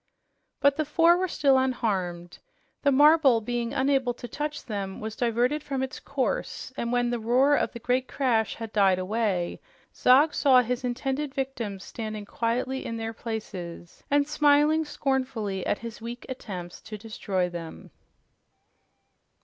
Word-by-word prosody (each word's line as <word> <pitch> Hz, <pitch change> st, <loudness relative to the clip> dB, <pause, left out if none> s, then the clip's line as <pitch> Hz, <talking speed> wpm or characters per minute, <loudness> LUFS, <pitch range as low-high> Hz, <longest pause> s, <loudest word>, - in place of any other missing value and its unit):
But 280 Hz, 0 st, +4 dB
the 310 Hz, -, +1 dB
four 330 Hz, +3 st, +4 dB
were 370 Hz, +1 st, 0 dB
still 275 Hz, -5 st, +3 dB
unharmed. 190 Hz, -9 st, -2 dB, 0.4 s
The 285 Hz, -, +3 dB
marble, 290 Hz, -3 st, +6 dB
being 235 Hz, +1 st, -3 dB
unable 265 Hz, -2 st, +1 dB
to 245 Hz, -, -8 dB
touch 295 Hz, +3 st, -4 dB
them, 200 Hz, -3 st, -4 dB
was 220 Hz, 0 st, -5 dB
diverted 245 Hz, +6 st, +1 dB
from 270 Hz, -2 st, -3 dB
its 265 Hz, -, -5 dB
course, 280 Hz, -, -3 dB
and 235 Hz, -, -2 dB
when 245 Hz, 0 st, +1 dB
the 240 Hz, -, -1 dB
roar 255 Hz, +6 st, +3 dB
of -, -, 0 dB
the -, -, -8 dB
great 250 Hz, +2 st, 0 dB
crash 235 Hz, -5 st, 0 dB
had 225 Hz, -1 st, -7 dB
died 195 Hz, -3 st, +4 dB
away, 185 Hz, -2 st, -1 dB, 0.3 s
Zog 280 Hz, +5 st, +5 dB
saw 260 Hz, -3 st, +5 dB
his 250 Hz, +2 st, -2 dB
intended 270 Hz, +3 st, -2 dB
victims 235 Hz, -8 st, -3 dB
standing 215 Hz, -2 st, -6 dB
quietly 245 Hz, +5 st, -2 dB
in 230 Hz, -, -4 dB
their 225 Hz, 0 st, -4 dB
places 195 Hz, -7 st, -7 dB
and 285 Hz, 0 st, +3 dB
smiling 300 Hz, +1 st, +3 dB
scornfully 255 Hz, -10 st, -2 dB
at -, -, +1 dB
his 230 Hz, -1 st, -8 dB
weak 235 Hz, +2 st, -7 dB
attempts 185 Hz, -9 st, -7 dB
to 215 Hz, -, -8 dB
destroy 200 Hz, -4 st, -2 dB
them. 170 Hz, -2 st, -8 dB
245 Hz, 150 wpm, -27 LUFS, 215-275 Hz, 0.4 s, marble